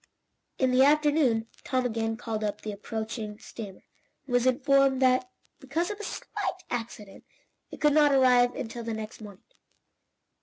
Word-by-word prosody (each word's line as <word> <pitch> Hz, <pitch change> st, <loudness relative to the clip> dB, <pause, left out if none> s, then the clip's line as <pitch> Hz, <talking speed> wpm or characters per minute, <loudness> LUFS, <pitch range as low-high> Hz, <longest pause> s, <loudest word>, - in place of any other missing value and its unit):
In 260 Hz, -1 st, +2 dB
the 255 Hz, +1 st, +4 dB
afternoon, 290 Hz, -6 st, +3 dB, 0.2 s
Tom 255 Hz, -1 st, 0 dB
again 225 Hz, -1 st, -1 dB
called 225 Hz, -2 st, -4 dB
up 210 Hz, 0 st, -3 dB
the 215 Hz, -, -4 dB
approaching 220 Hz, +1 st, -5 dB
steamer, 205 Hz, -3 st, -10 dB, 0.4 s
and 250 Hz, -, -7 dB
was 245 Hz, +1 st, +3 dB
informed 275 Hz, 0 st, +3 dB
that, 255 Hz, +8 st, +3 dB, 0.3 s
because 320 Hz, +7 st, -2 dB
of 415 Hz, -, -7 dB
a -, -, -6 dB
slight 365 Hz, -2 st, -4 dB
accident, 225 Hz, -4 st, -6 dB, 0.5 s
it -, -, -10 dB
could 295 Hz, -1 st, +4 dB
not 295 Hz, -1 st, +5 dB
arrive 250 Hz, -2 st, +4 dB
until 235 Hz, 0 st, -5 dB
the 230 Hz, -1 st, -3 dB
next 220 Hz, 0 st, -7 dB
morning. 205 Hz, -3 st, -11 dB
245 Hz, 155 wpm, -28 LUFS, 220-275 Hz, 0.5 s, not